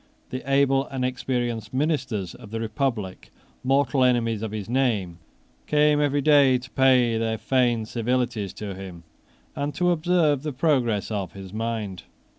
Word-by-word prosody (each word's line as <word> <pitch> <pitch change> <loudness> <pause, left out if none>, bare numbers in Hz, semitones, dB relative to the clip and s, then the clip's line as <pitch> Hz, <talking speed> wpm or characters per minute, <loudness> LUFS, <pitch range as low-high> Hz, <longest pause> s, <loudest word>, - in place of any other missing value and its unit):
The 130 - -4
able 135 0 +3
and 130 -2 -3
experienced 125 -2 -2
ministers 130 - -1
of 105 - -12
the 115 +1 -4
republic, 110 -4 -3 0.3
mortal 135 0 +2
enemies 115 -4 +2
of 110 - -3
his 105 -3 -5
name, 110 -9 0 0.5
came 150 0 +3
every 145 0 +1
day 140 -3 +5
to 130 +1 -11
pay 125 -4 +3
their 110 0 -1
feigned 120 -3 +1
civilities 120 -3 -1
to 105 -2 -6
him, 90 -3 -9 0.5
and 145 +1 -3
to 180 0 +2
observe 165 -4 +2
the 150 -1 -4
progress 125 -8 +1
of 100 -3 -3
his 95 -1 -10
mind. 110 -4 -3
125 Hz, 150 wpm, -24 LUFS, 110-135 Hz, 0.5 s, day